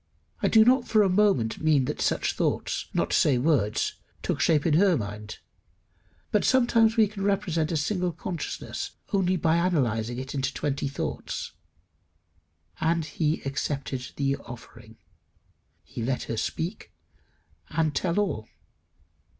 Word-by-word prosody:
I -, -, +3 dB
do 220 Hz, -1 st, +6 dB
not 250 Hz, 0 st, +4 dB
for 215 Hz, -2 st, +4 dB
a 195 Hz, -, +2 dB
moment 185 Hz, -, +2 dB
mean 155 Hz, -4 st, +3 dB
that -, -, -3 dB
such -, -, +1 dB
thoughts, -, -, -1 dB
not -, -, 0 dB
to -, -, +3 dB
say 135 Hz, -4 st, +4 dB
words, 125 Hz, -6 st, +1 dB, 0.3 s
took -, -, -1 dB
shape 150 Hz, -3 st, +3 dB
in 165 Hz, -, +3 dB
her 180 Hz, +1 st, +4 dB
mind; 105 Hz, -1 st, -6 dB, 0.9 s
but 210 Hz, -, +2 dB
sometimes 235 Hz, -3 st, +4 dB
we 220 Hz, -2 st, +6 dB
can 200 Hz, -1 st, -6 dB
represent 185 Hz, -6 st, 0 dB
a 165 Hz, -, +1 dB
single 180 Hz, +3 st, 0 dB
consciousness 165 Hz, 0 st, -5 dB, 0.2 s
only 185 Hz, -2 st, +2 dB
by 165 Hz, -1 st, +2 dB
analysing 120 Hz, -10 st, 0 dB
it 130 Hz, +1 st, -5 dB
into 135 Hz, -1 st, -1 dB
twenty 140 Hz, -1 st, -1 dB
thoughts. 140 Hz, -, -4 dB, 1.3 s
And 165 Hz, 0 st, +1 dB
he 155 Hz, +1 st, -1 dB
accepted 135 Hz, -1 st, -3 dB
the 140 Hz, -1 st, 0 dB
offering. 115 Hz, -2 st, -12 dB, 0.9 s
He -, -, -8 dB
let 125 Hz, +2 st, -1 dB
her 115 Hz, -, -4 dB
speak, 165 Hz, -, -3 dB, 0.8 s
and 160 Hz, -2 st, 0 dB
tell 170 Hz, +7 st, 0 dB
all. 145 Hz, -, -1 dB
155 Hz, 140 wpm, -27 LUFS, 130-190 Hz, 1.3 s, do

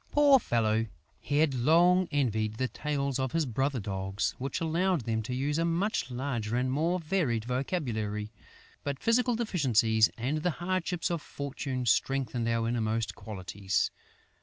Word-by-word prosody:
Poor 285 Hz, -2 st, +6 dB
fellow, 115 Hz, -, +1 dB, 0.3 s
he 145 Hz, +8 st, -2 dB
had 155 Hz, -2 st, +3 dB
long 170 Hz, +8 st, +4 dB
envied 110 Hz, -7 st, 0 dB
the 130 Hz, +3 st, -1 dB
tails 140 Hz, +2 st, -2 dB
of 130 Hz, -1 st, -1 dB
his 165 Hz, -2 st, +2 dB
brother 135 Hz, +2 st, -1 dB
dogs, 95 Hz, -1 st, -2 dB
which 135 Hz, +2 st, -3 dB
allowed 170 Hz, +1 st, +1 dB
them 110 Hz, -1 st, -1 dB
to 125 Hz, +3 st, -4 dB
use 145 Hz, +4 st, 0 dB
a -, -, +2 dB
much 170 Hz, -1 st, 0 dB
larger 120 Hz, -3 st, -2 dB
and 130 Hz, +1 st, 0 dB
more 165 Hz, +6 st, +1 dB
varied 155 Hz, -, 0 dB
vocabulary. 115 Hz, -, -2 dB, 0.5 s
But 140 Hz, -1 st, -2 dB
physical 240 Hz, -, +2 dB
deficiencies 120 Hz, -, +3 dB
and 130 Hz, +7 st, -1 dB
the 180 Hz, -, 0 dB
hardships 180 Hz, 0 st, -1 dB
of 170 Hz, -3 st, -1 dB
fortune 135 Hz, -3 st, -4 dB
strengthen 120 Hz, 0 st, +1 dB
our 115 Hz, 0 st, +1 dB
innermost 115 Hz, -1 st, -1 dB
qualities. 100 Hz, -2 st, -2 dB
130 Hz, 150 wpm, -29 LUFS, 115-165 Hz, 0.5 s, Poor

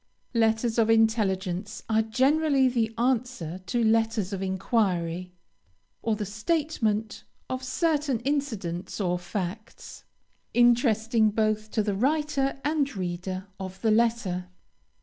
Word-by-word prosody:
LETTERS 225 Hz, 0 st, +2 dB
OF 225 Hz, -1 st, +3 dB
INTELLIGENCE 210 Hz, -3 st, +1 dB
are 220 Hz, 0 st, +3 dB
generally 270 Hz, +5 st, +3 dB
the 235 Hz, -3 st, 0 dB
answer 235 Hz, -8 st, -1 dB
to 235 Hz, +6 st, +1 dB
letters 220 Hz, -3 st, +1 dB
of 195 Hz, -, -3 dB
enquiry, 185 Hz, -3 st, 0 dB, 0.7 s
or 225 Hz, -1 st, 0 dB
the 210 Hz, 0 st, -3 dB
statement 220 Hz, -, -1 dB, 0.3 s
of 255 Hz, 0 st, -2 dB
certain 290 Hz, -2 st, 0 dB
incidents 220 Hz, -13 st, -2 dB
or 180 Hz, -3 st, 0 dB
facts, 200 Hz, +4 st, -6 dB, 0.5 s
interesting 230 Hz, -2 st, +4 dB
both 215 Hz, 0 st, 0 dB
to 215 Hz, 0 st, 0 dB
the 205 Hz, -1 st, -1 dB
writer 275 Hz, +4 st, 0 dB
and 290 Hz, -4 st, 0 dB
reader 185 Hz, +1 st, -4 dB
of 190 Hz, 0 st, -7 dB
the 220 Hz, -, +3 dB
letter. 215 Hz, -5 st, +1 dB
220 Hz, 115 wpm, -27 LUFS, 195-245 Hz, 0.7 s, interesting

